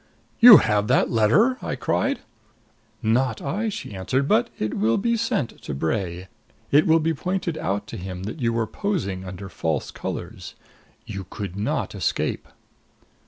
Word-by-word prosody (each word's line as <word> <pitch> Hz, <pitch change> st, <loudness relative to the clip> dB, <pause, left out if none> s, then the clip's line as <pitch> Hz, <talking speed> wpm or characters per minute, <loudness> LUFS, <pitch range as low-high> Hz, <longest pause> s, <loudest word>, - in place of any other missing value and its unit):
"You 235 Hz, -3 st, +11 dB
have 105 Hz, -1 st, +1 dB
that 130 Hz, -, +2 dB
letter!" 200 Hz, -, +3 dB
I -, -, -3 dB
cried. 275 Hz, +1 st, -1 dB, 0.8 s
"Not 115 Hz, +1 st, +1 dB
I," 205 Hz, +11 st, -2 dB
she 195 Hz, -, -6 dB
answered. 130 Hz, +9 st, -1 dB
"But 230 Hz, +5 st, +3 dB
it 110 Hz, -, -2 dB
will 110 Hz, +3 st, +1 dB
be 235 Hz, +3 st, +1 dB
sent 220 Hz, -, -2 dB
to 70 Hz, -, -5 dB
Bray. 85 Hz, +4 st, -2 dB, 0.4 s
It 145 Hz, +2 st, +5 dB
will 160 Hz, 0 st, +6 dB
be 160 Hz, +1 st, 0 dB
pointed 180 Hz, +2 st, -2 dB
out 100 Hz, +2 st, -2 dB
to -, -, -6 dB
him 90 Hz, 0 st, -6 dB
that 110 Hz, +9 st, -6 dB
you 115 Hz, -1 st, +2 dB
were 115 Hz, -1 st, 0 dB
posing 110 Hz, -, -3 dB
under 95 Hz, +1 st, -7 dB
false 80 Hz, -4 st, -2 dB
colors. -, -, -6 dB, 0.5 s
You 95 Hz, -2 st, -7 dB
could 100 Hz, -3 st, -6 dB
not 100 Hz, +2 st, -2 dB
escape!" -, -, -2 dB
115 Hz, 160 wpm, -24 LUFS, -, 0.8 s, You